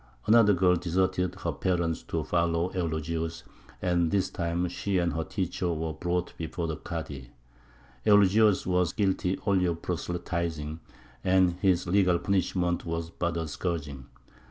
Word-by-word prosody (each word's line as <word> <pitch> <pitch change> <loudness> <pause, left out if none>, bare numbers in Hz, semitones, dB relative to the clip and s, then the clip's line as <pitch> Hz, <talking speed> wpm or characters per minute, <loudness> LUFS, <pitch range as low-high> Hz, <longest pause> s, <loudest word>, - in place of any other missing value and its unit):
Another 110 -1 +6
girl 90 0 +4
deserted 90 +1 0
her 85 -3 -3
parents 85 0 -1
to - - -3
follow 85 +1 0
Eulogius; 80 -1 -2 0.4
and 85 -2 +2
this 100 +1 0
time 85 +1 -1
she 95 +2 -2
and 85 -2 +1
her 80 - -1
teacher 90 0 -2
were 80 -1 -2
brought 90 +2 -2
before 85 +1 -3
the 80 -2 -3
Kādy. 75 -7 -6 0.8
Eulogius 105 +1 +5
was 90 -1 +1
guilty 95 -2 0
only 95 -2 +3
of 85 -1 -2
proselytizing, 85 -3 -3 0.4
and 95 -1 +4
his 90 -2 +3
legal 90 -1 +3
punishment 90 -2 0
was 85 0 -4
but 85 0 -2
a 80 -1 -2
scourging. 75 -4 -4
85 Hz, 140 wpm, -28 LUFS, 85-95 Hz, 0.8 s, Another